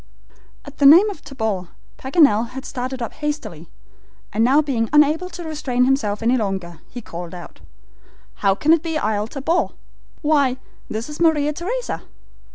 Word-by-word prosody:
At 285 Hz, 0 st, -12 dB
the 280 Hz, -, +7 dB
name 360 Hz, +9 st, +8 dB
of 375 Hz, -, -11 dB
Tabor, 220 Hz, -9 st, -3 dB, 0.3 s
Paganel 265 Hz, -6 st, +3 dB
had 265 Hz, +1 st, -7 dB
started 255 Hz, -1 st, -4 dB
up 230 Hz, -, -5 dB
hastily, 295 Hz, -, -5 dB, 0.6 s
and 220 Hz, +2 st, +2 dB
now 265 Hz, +5 st, +5 dB
being 255 Hz, -7 st, 0 dB
unable 300 Hz, +4 st, +3 dB
to 345 Hz, 0 st, -8 dB
restrain 280 Hz, -6 st, 0 dB
himself 225 Hz, -6 st, 0 dB
longer, 195 Hz, -8 st, -1 dB
he 245 Hz, -, -8 dB
called 175 Hz, -2 st, -7 dB
out: 175 Hz, -, -11 dB, 0.8 s
"How 195 Hz, -1 st, +2 dB
can 310 Hz, +10 st, +3 dB
it 330 Hz, -, +3 dB
be 325 Hz, -1 st, -2 dB
Isle 210 Hz, -5 st, -1 dB
Tabor? 300 Hz, +7 st, 0 dB, 0.6 s
Why, 285 Hz, -4 st, +2 dB, 0.3 s
this 220 Hz, +2 st, -4 dB
is 300 Hz, 0 st, -8 dB
Maria 300 Hz, -3 st, +3 dB
Theresa!" 460 Hz, +10 st, -4 dB
270 Hz, 155 wpm, -21 LUFS, 220-305 Hz, 0.8 s, name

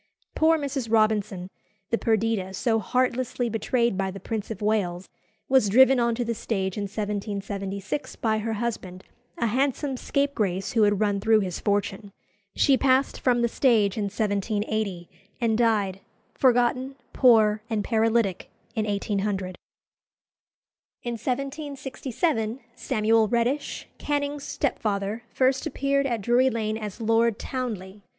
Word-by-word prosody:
Poor 320 Hz, +1 st, +4 dB
Mrs. 275 Hz, -6 st, -3 dB
Robinson, 210 Hz, -4 st, +1 dB, 0.4 s
the 230 Hz, -, +3 dB
"Perdita" 220 Hz, -4 st, 0 dB
so 225 Hz, +2 st, +1 dB
heartlessly 250 Hz, +1 st, 0 dB
betrayed 235 Hz, 0 st, 0 dB
by 195 Hz, 0 st, 0 dB
the 195 Hz, +1 st, -7 dB
Prince 215 Hz, +2 st, -4 dB
of 220 Hz, -, -5 dB
Wales, 195 Hz, -4 st, -1 dB, 0.4 s
was 260 Hz, -6 st, +4 dB
driven 260 Hz, +4 st, +6 dB
on 235 Hz, -1 st, +2 dB
to 240 Hz, 0 st, -2 dB
the 235 Hz, -, -1 dB
stage 195 Hz, -4 st, -2 dB
in 205 Hz, -, -2 dB
1776 200 Hz, +2 st, -4 dB
by 220 Hz, -3 st, 0 dB
her 225 Hz, +1 st, -2 dB
husband, 205 Hz, -5 st, -4 dB, 0.3 s
a 235 Hz, -, 0 dB
handsome 270 Hz, +4 st, 0 dB
scapegrace 220 Hz, -10 st, -1 dB
who 230 Hz, -, +2 dB
had 205 Hz, -2 st, +3 dB
run 205 Hz, -2 st, +1 dB
through 220 Hz, +1 st, +4 dB
his 185 Hz, -3 st, -3 dB
fortune. 205 Hz, 0 st, -1 dB, 0.4 s
She 275 Hz, -2 st, +4 dB
passed 265 Hz, 0 st, +2 dB
from 240 Hz, -2 st, +2 dB
the -, -, +4 dB
stage 225 Hz, -5 st, +2 dB
in 210 Hz, -, -1 dB
1780, 205 Hz, -2 st, -2 dB, 0.3 s
and 230 Hz, -2 st, +1 dB
died, 210 Hz, -5 st, +1 dB, 0.3 s
forgotten, 255 Hz, +1 st, +2 dB, 0.2 s
poor, 220 Hz, -4 st, +5 dB
and 215 Hz, -2 st, -1 dB
paralytic, 225 Hz, -4 st, +1 dB, 0.2 s
in 215 Hz, -1 st, -1 dB
1800. 200 Hz, -2 st, -2 dB, 1.5 s
In 240 Hz, -, -3 dB
1767 265 Hz, -1 st, -2 dB, 0.2 s
Samuel 220 Hz, -2 st, +2 dB
Reddish, 240 Hz, +5 st, -1 dB
Canning's 290 Hz, -1 st, -2 dB
stepfather, 215 Hz, -4 st, -2 dB
first 265 Hz, +3 st, +1 dB
appeared 275 Hz, -1 st, 0 dB
at 235 Hz, -4 st, -2 dB
Drury 245 Hz, +5 st, +3 dB
Lane 220 Hz, -2 st, -2 dB
as 210 Hz, 0 st, -6 dB
Lord 225 Hz, 0 st, +2 dB
Townley. 210 Hz, -6 st, -5 dB
225 Hz, 130 wpm, -25 LUFS, 205-250 Hz, 1.5 s, driven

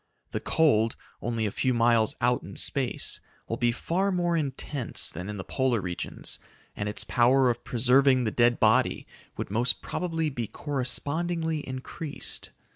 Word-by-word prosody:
The -, -, -1 dB
cold, 115 Hz, -8 st, +3 dB, 0.3 s
only 115 Hz, -2 st, -1 dB
a 105 Hz, -, -1 dB
few 130 Hz, +3 st, +1 dB
miles 115 Hz, -2 st, +3 dB
out 120 Hz, +1 st, +3 dB
in 95 Hz, +4 st, -10 dB
space, 135 Hz, -4 st, -1 dB, 0.3 s
will 115 Hz, -, -2 dB
be 120 Hz, -1 st, +2 dB
far 185 Hz, +10 st, 0 dB
more 175 Hz, -2 st, +1 dB
intense 140 Hz, -3 st, -2 dB
than 90 Hz, +5 st, -6 dB
in 105 Hz, -, -4 dB
the 95 Hz, -, -4 dB
polar 130 Hz, -1 st, +1 dB
regions 90 Hz, -2 st, -5 dB, 0.4 s
and 105 Hz, 0 st, -2 dB
its 105 Hz, -, -3 dB
power 125 Hz, +1 st, +4 dB
of 120 Hz, -, -6 dB
preserving 130 Hz, +2 st, +4 dB
the 110 Hz, -, 0 dB
dead 120 Hz, +1 st, +3 dB
body 120 Hz, +3 st, +3 dB, 0.3 s
would -, -, -4 dB
most 120 Hz, +3 st, +2 dB
probably 165 Hz, -3 st, -1 dB
be 120 Hz, -4 st, -3 dB
correspondingly 150 Hz, -, -1 dB
increased. 135 Hz, +4 st, -5 dB
125 Hz, 155 wpm, -28 LUFS, 115-145 Hz, 0.4 s, power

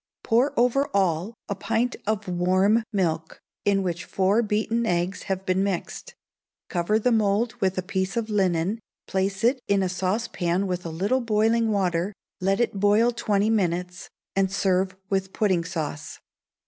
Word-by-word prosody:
Pour 240 Hz, +3 st, +2 dB
over 250 Hz, +4 st, +3 dB
all 190 Hz, +2 st, +1 dB
a 200 Hz, -, -1 dB
pint 225 Hz, +5 st, -1 dB
of 215 Hz, -1 st, -1 dB
warm 185 Hz, +5 st, +3 dB
milk, 165 Hz, -6 st, -1 dB, 0.3 s
in 195 Hz, -1 st, +2 dB
which 175 Hz, -1 st, -2 dB
four 195 Hz, +4 st, +2 dB
beaten 220 Hz, +1 st, 0 dB
eggs 175 Hz, +2 st, 0 dB
have 190 Hz, 0 st, -2 dB
been 185 Hz, +1 st, +1 dB
mixed; 200 Hz, -, -4 dB, 0.5 s
cover 180 Hz, +4 st, +1 dB
the 245 Hz, +3 st, +1 dB
mould 220 Hz, +1 st, +2 dB
with 190 Hz, -1 st, +1 dB
a 185 Hz, -, -1 dB
piece 190 Hz, +2 st, -2 dB
of 230 Hz, -2 st, -1 dB
linen, 190 Hz, -1 st, +1 dB, 0.3 s
place 190 Hz, +2 st, -1 dB
it 250 Hz, +2 st, +3 dB
in 200 Hz, -1 st, +2 dB
a 185 Hz, -, 0 dB
saucepan 185 Hz, -1 st, -1 dB
with 180 Hz, -2 st, -3 dB
a -, -, -4 dB
little 200 Hz, +11 st, 0 dB
boiling 225 Hz, 0 st, +2 dB
water, 185 Hz, -1 st, 0 dB, 0.3 s
let 195 Hz, +2 st, +1 dB
it 230 Hz, -4 st, 0 dB
boil 210 Hz, +4 st, +4 dB
twenty 210 Hz, -2 st, +1 dB
minutes, 180 Hz, -3 st, -1 dB, 0.3 s
and 195 Hz, -1 st, +2 dB
serve 190 Hz, -1 st, +1 dB, 0.2 s
with 195 Hz, 0 st, -1 dB
pudding 190 Hz, -5 st, +1 dB
sauce. 160 Hz, -4 st, -5 dB
195 Hz, 160 wpm, -25 LUFS, 185-220 Hz, 0.5 s, boil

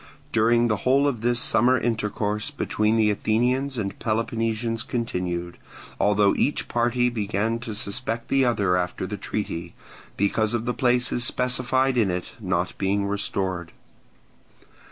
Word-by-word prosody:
During 115 Hz, +2 st, +3 dB
the 105 Hz, -2 st, +1 dB
whole 135 Hz, +7 st, +3 dB
of 120 Hz, -6 st, -1 dB
this 120 Hz, +1 st, +1 dB
summer 125 Hz, +2 st, +3 dB
intercourse 105 Hz, -1 st, -1 dB
between 110 Hz, -6 st, 0 dB
the 110 Hz, -1 st, +4 dB
Athenians 125 Hz, +6 st, 0 dB
and 100 Hz, -3 st, -3 dB
Peloponnesians 115 Hz, 0 st, -1 dB
continued, 90 Hz, -8 st, -3 dB, 0.4 s
although 105 Hz, -1 st, +4 dB
each 145 Hz, -, 0 dB
party 120 Hz, +1 st, +1 dB
began 110 Hz, 0 st, -1 dB
to 115 Hz, -3 st, -6 dB
suspect 115 Hz, +3 st, -3 dB
the 135 Hz, -1 st, +3 dB
other 120 Hz, -5 st, +1 dB
directly 90 Hz, -1 st, +3 dB
after 90 Hz, +1 st, -4 dB
the 105 Hz, +2 st, -5 dB
treaty, 85 Hz, -4 st, -4 dB, 0.4 s
because 110 Hz, +3 st, +1 dB
of 115 Hz, 0 st, -2 dB
the 125 Hz, -, 0 dB
places 125 Hz, -1 st, +1 dB
specified 125 Hz, +1 st, +2 dB
in 105 Hz, -4 st, +3 dB
it 90 Hz, 0 st, -3 dB
not -, -, -1 dB
being 100 Hz, +1 st, +1 dB
restored. 95 Hz, -3 st, -3 dB
115 Hz, 140 wpm, -24 LUFS, 100-120 Hz, 0.4 s, the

